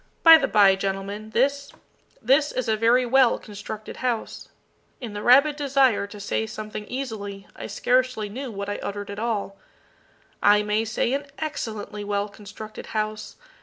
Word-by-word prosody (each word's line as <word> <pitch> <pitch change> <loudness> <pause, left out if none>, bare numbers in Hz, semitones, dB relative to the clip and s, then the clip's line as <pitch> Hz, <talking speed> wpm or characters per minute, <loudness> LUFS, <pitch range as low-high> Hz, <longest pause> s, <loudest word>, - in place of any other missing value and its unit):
By 325 -1 +10
the 270 - 0
by, 205 -4 +6
gentlemen, 195 +2 -4
this 280 +4 0 0.5
this 280 +5 +3
is 255 - -3
a 220 - +2
very 235 +3 +3
well 260 0 +4
constructed 210 +1 -8
house," 245 -3 -3 0.5
[In 235 -5 -7
the 205 - -5
rabid 280 +6 +5
desire 270 -7 +2
to 205 0 -11
say 210 +2 -2
something 215 -1 -7
easily, 210 -7 -5
I - - -7
scarcely 250 +1 +1
knew 255 +6 -6
what 200 -1 -5
I 205 - -3
uttered 205 0 -5
at 200 - -6
all,] 210 -4 -3 0.8
"I 210 0 +5
may 210 +2 0
say 230 +2 -1
an 285 +1 -2
excellently 220 -9 -5
well 205 0 -2
constructed 210 +1 -10
house. 215 0 -3
215 Hz, 160 wpm, -24 LUFS, 205-255 Hz, 0.8 s, By